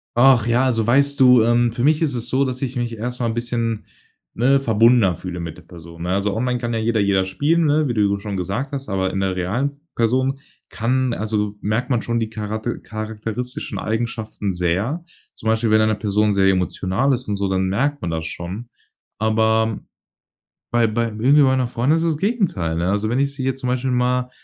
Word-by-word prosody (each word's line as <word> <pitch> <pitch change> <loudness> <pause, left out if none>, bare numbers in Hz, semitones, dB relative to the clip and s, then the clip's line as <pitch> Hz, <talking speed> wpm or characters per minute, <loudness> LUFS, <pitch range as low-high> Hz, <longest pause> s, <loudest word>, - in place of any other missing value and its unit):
Ach 120 -2 +5
ja, 120 +3 +3
also, 115 -4 +1
weißt 140 +3 +3
du, 125 -3 +7
ähm, 120 0 +3
für 120 +2 -3
mich 155 +2 +3
ist 150 -4 +1
es 120 - -4
so, 135 +1 +2
dass 130 -1 -3
ich 130 -1 -3
mich 120 -2 -3
erst 125 +3 -4
mal 120 - 0
'n 115 - -1
bisschen, 115 -2 -2 0.5
ne, 135 +4 +3
verbundener 115 -5 +4
fühle 90 0 -6
mit 85 -1 -6
der 85 - -13
Person, 85 0 -11
ne? 90 - -3
Also, 100 +1 0
online 125 +2 -1
kann 120 -1 -3
ja 115 - 0
jeder 110 0 +1
jeden 100 -2 +2
spielen, 155 - +1
ne, 150 0 +2
wie 120 - -1
du 100 -2 +1
schon 100 -1 -5
gesagt 100 +10 -3
hast, 135 -4 -5
aber 95 -1 0
in 95 - -1
der 95 -1 0
realen 125 +11 -2 0.2
Person, 130 +4 +1 0.3
kann 125 +2 0
also, 105 -2 -2
merkt 115 +6 -1
man 120 -3 +2
schon 120 0 -1
die 110 -1 -2
chara 110 -1 -4
charakteristischen 110 +1 -5
Eigenschaften 110 -3 -3
sehr. 95 - -1 0.3
Zum 110 - -7
Beispiel, 110 +1 +2
wenn 110 0 +4
eine 110 -1 +2
Person 105 0 +1
sehr 95 -1 +3
emotional 95 +7 0
ist 125 -1 -3
und 105 - -1
so, 100 0 -1
dann 95 0 0
merkt 140 +9 0
man 90 - -3
das 80 0 -3
schon. 95 +9 -6 0.5
Aber 110 0 +2 0.9
bei 120 -1 +3
bei 115 +2 0
irgendwie 125 +7 +3
meiner 130 -2 +3
Freundin 125 +6 +1
ist 165 - 0
es 165 -1 +1
das 150 - -8
Gegenteil, 175 - 0
ne, 85 +2 0
also, 105 +2 0
wenn 125 - 0
ich 140 0 0
sie 135 - -4
jetzt 135 0 -1
zum 125 - -3
Beispiel 130 +1 -1
mal, 125 0 +1
115 Hz, 215 wpm, -21 LUFS, 105-130 Hz, 0.9 s, du